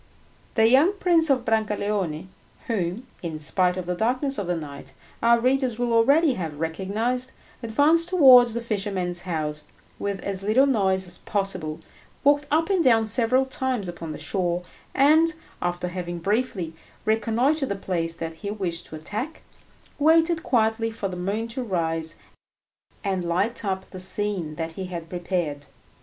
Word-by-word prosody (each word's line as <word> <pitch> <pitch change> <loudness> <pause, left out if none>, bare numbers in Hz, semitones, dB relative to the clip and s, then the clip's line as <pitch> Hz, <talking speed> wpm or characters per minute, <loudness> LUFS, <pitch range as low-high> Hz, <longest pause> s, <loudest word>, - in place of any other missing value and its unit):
The 225 -1 +5
young 280 - +5
Prince 345 -5 +2
of 255 -3 +2
Brancaleone, 205 -7 -1 0.4
whom, 205 +1 -2 0.2
in 165 -3 -4
spite 180 +4 +1
of 185 - -4
the 180 - -1
darkness 255 +7 0
of 195 - -3
the 175 - 0
night, 145 -4 -8 0.3
our 235 0 +5
readers 255 -1 +1
will 240 -1 0
already 280 +6 +4
have 160 -8 -5
recognised, 215 +10 -2 0.3
advanced 295 +9 +3
towards 255 -9 +7
the 235 - -1
fisherman's 195 -5 -2
house, 150 -2 -2 0.4
with 200 -1 -2
as 195 -1 -3
little 215 +7 +4
noise 190 -8 +1
as 175 - -3
possible, 185 -6 -3 0.4
walked 290 +1 +3
up 325 +5 +2
and 370 -3 +3
down 225 -4 +4
several 245 +4 +3
times 260 -6 -2
upon 170 -2 -6
the 150 - -6
shore, 180 -2 -1 0.3
and, 315 +4 +5 0.3
after 175 0 -2
having 175 -1 -5
briefly 195 -2 -1 0.3
reconnoitred 240 +7 +1
the 200 - -1
place 170 -4 -2
that 165 -1 -5
he 200 - -5
wished 180 -5 -3
to - - -9
attack, 215 - -5 0.6
waited 325 +2 +4
quietly 225 -4 +1
for 220 -3 -4
the 180 - -6
moon 200 +6 -2
to 260 +3 -3
rise 165 -7 -1 0.9
and 190 -3 -1
light 185 +8 -1
up 190 -2 -2
the 185 - -8
scene 185 -4 -2
that 165 0 -4
he 190 +3 -6
had 170 -2 -7
prepared. 175 -5 -3
205 Hz, 155 wpm, -25 LUFS, 175-255 Hz, 0.9 s, towards